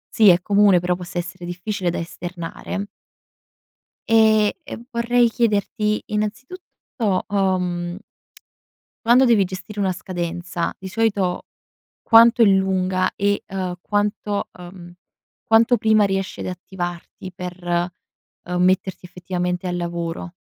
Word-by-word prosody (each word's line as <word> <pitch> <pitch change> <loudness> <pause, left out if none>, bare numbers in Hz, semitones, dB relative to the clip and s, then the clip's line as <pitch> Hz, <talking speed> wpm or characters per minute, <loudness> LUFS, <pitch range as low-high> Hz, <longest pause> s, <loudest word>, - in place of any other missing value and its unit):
sì, 215 -3 +7
è 175 0 +5
comune, 200 -2 +4
però 180 0 0
possa 175 0 -8
essere 175 +1 -7
difficile 180 +1 -3
da - - -2
esternare. 175 +3 -6 1.2
Ehm, 220 -2 +4
e - - -7
vorrei 235 0 +3
chiederti 215 -1 0
innanzitutto, 215 - -3
uhm 180 -3 -1 1.1
quando 250 +3 +6
devi 230 -5 +4
gestire 190 +3 -8
una 190 -2 +1
scadenza, 175 -1 -4
di 190 - -8
solito 205 -4 0 0.6
quanto 230 +1 +6
è - - +9
lunga, 190 -2 +2
e 200 0 0
ehm 185 -2 -3
quanto, 205 0 -1
uhm, 175 -1 -11 0.5
quanto 225 +2 +4
prima 220 -2 +3
riesci 195 -1 -2
ad - - -5
attivarti 180 0 -6
per, 175 -1 -2 0.6
uhm, 180 0 -1
metterti 185 0 +1
effettivamente 180 0 -3
al 175 0 -2
lavoro? 170 0 -4
190 Hz, 115 wpm, -21 LUFS, 180-210 Hz, 1.2 s, è